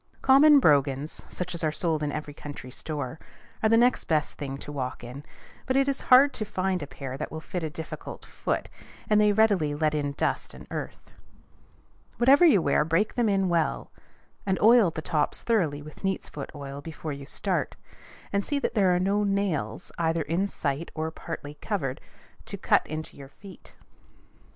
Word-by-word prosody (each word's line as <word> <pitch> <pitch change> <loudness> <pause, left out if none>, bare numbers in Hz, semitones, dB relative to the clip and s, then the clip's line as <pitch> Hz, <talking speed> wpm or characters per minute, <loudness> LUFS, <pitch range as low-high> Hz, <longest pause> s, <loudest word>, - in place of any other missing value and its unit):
Common 280 +2 +7
brogans, 145 - +2
such 180 0 -4
as 170 -1 -3
are 155 - +2
sold 160 0 0
in 150 -1 -1
every 150 -1 -5
country 145 -3 -9
store, 145 +1 -5 0.4
are 220 - +3
the 225 - +5
next 245 +2 +3
best 155 -2 0
things 140 -1 -5
to - - -7
walk 130 -3 -4
in; 125 +4 -8 0.4
but 260 +1 +2
it 275 0 +3
is 275 - -1
hard 270 +2 +7
to 220 - -3
find 190 -3 -1
a 145 - -5
pair 135 -2 -7
that - - -4
will 160 - -5
fit 175 +3 -5
a 160 - -2
difficult 160 +1 -8
foot, - - -3 0.4
and 210 0 +4
they 210 0 +5
readily 200 -9 +3
let 155 0 +1
in 145 -2 -1
dust - - -2
and - - -11
earth. - - -6 1.1
Whatever 270 +7 +6
you 210 - +5
wear, - - +3
break 165 +7 +1
them 240 -3 +1
in 195 -1 +2
well, 165 - 0 0.5
and 190 -1 0
oil 225 -3 +6
the 160 -1 -6
tops 150 -3 0
thoroughly 165 -11 +1
with 155 +5 -13
neat's 195 -1 -1
foot - - -7
oil 140 -1 -7
before 155 -1 -6
you 140 0 -9
start; - - -2 0.6
and 200 0 +1
see 290 - -1
that 280 - -1
there 190 -5 +3
are - - +1
no 200 +3 +1
nails, 190 - -1
either 165 -1 +1
in 170 +7 0
sight 145 -3 -3
or 160 0 -2
partly 145 -2 -7
covered, 145 -12 -3 0.5
to - - -5
cut - - +2 0.2
your 135 -1 -12
feet. 195 +6 -14
165 Hz, 185 wpm, -27 LUFS, 145-205 Hz, 1.1 s, Common